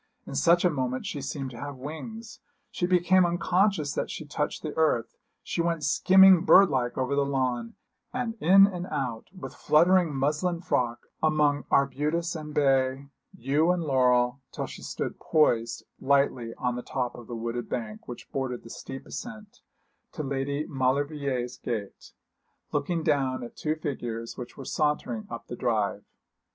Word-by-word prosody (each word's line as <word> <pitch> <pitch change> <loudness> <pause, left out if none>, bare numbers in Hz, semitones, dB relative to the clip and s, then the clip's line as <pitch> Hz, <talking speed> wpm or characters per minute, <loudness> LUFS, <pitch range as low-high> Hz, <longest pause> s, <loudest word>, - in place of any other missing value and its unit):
In - - -8
such 170 +6 +4
a 180 - +4
moment 130 -3 -2
she 145 - -4
seemed 135 -1 -4
to 115 - -10
have 145 0 -6
wings. 215 - -8 0.3
She 175 - -1
became 180 +1 +4
unconscious 175 -2 +1
that - - -2
she 160 - -6
touched 150 0 -3
the 155 - -5
earth; 125 -8 +1 0.3
she 170 - -2
went 165 -2 -1
skimming 185 +4 +6
bird 195 +1 +7
like 125 -2 -1
over 130 +1 0
the 140 - +3
lawn, 130 -4 -1 0.4
and 245 -2 -2
in 195 +4 +7
and 180 -2 -4
out, 120 -8 -3
with 185 -1 -9
fluttering 175 +1 +4
muslin 150 +6 0
frock, 120 -8 -1 0.2
among 150 -3 +2
arbutus 150 +5 +1
and 155 -1 -6
bay, 135 -1 +1 0.3
yew 145 +7 +1
and 180 -1 +1
laurel, 125 -2 +2
till - - -4
she - - -10
stood - - -4
poised 120 -7 +1 0.2
lightly 135 -4 +1
on 125 -1 -1
the 125 - -4
top 125 -1 -3
of 120 -2 -11
the 120 - -6
wooded 115 +1 -4
bank 110 -3 -5
which 120 - -9
bordered 130 -3 -3
the 115 - -11
steep 135 - -8
ascent 215 -4 -9 0.5
to 155 - -4
Lady 140 +2 -2
Maulevrier's 135 -2 -1
gate, 110 -6 -6 0.6
looking 160 +3 -1
down 135 -4 +1
at 120 - -9
two 155 0 -1
figures 120 -7 -5
which 125 - -9
were 135 - -8
sauntering 150 -8 -1
up 115 -1 -7
the 120 - -7
drive. 110 -4 -1
140 Hz, 165 wpm, -27 LUFS, 125-165 Hz, 0.6 s, bird